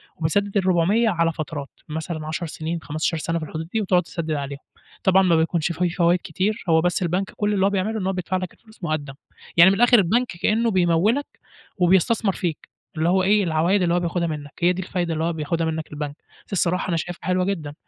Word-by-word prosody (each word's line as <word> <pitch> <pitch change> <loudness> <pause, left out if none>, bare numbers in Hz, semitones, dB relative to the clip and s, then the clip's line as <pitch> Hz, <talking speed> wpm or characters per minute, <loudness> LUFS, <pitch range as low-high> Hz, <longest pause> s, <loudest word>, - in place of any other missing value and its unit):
وبتسدِّد 200 +6 0
ال400 190 +5 +3
على 165 -3 +1
فترات، 150 -2 -5 0.2
مثلًا 155 0 -4
10 165 +2 -3
سنين 160 +1 -4
15 155 +2 -1
سنة 165 +2 -2
في 155 - -5
الحدود 160 +1 -6
دي، 220 - +1
وتقعد 185 -3 +3
تسدِّد 165 -2 -5
عليها، 140 -1 -3 0.4
طبعًا 190 0 +5
ما 170 -3 +4
بيكونش 165 +1 +1
في 175 +1 0
فوايد 175 +1 +2
كتير، 195 +6 -2
هو 160 0 +5
بس 180 +1 0
البنك 180 +3 -1
كُلّ 210 0 0
اللي 195 -1 +2
هو - - +4
بيعمله 205 +3 -1
إن 185 - -3
هو 190 - 0
بيدفع 185 +1 -2
لك 185 -1 -5
الفلوس 220 -5 -21
مُقدَّم، 155 -4 -2 0.4
يعني 170 +3 +9
من - - +1
الآخرالبنك 240 0 +4
كأنّه 225 +2 +2
بيموّلك 185 +9 +2 0.5
وبيستثمر 190 +3 +3
فيك، 170 -4 -4 0.3
اللي 165 +2 +2
هو 185 0 +3
إيه 205 +1 +3
العوايد 170 +4 +2
اللي 170 -1 +2
هو 175 - +3
بياخدها 170 0 -1
منك، 150 -2 -5
هي 180 +1 +4
دي 185 - -4
الفايدة 175 -2 -2
اللي 160 +1 -2
هو 170 0 0
بياخدها 160 +1 -1
منك 160 -1 -4
البنك، 145 -1 -5 0.3
بس - - -11
الصراحة 180 0 0
أنا 170 - +1
شايفها 175 +2 -5
حلوة 180 0 +2
جدًا، 160 -7 -3
175 Hz, 210 wpm, -23 LUFS, 160-190 Hz, 0.5 s, يعني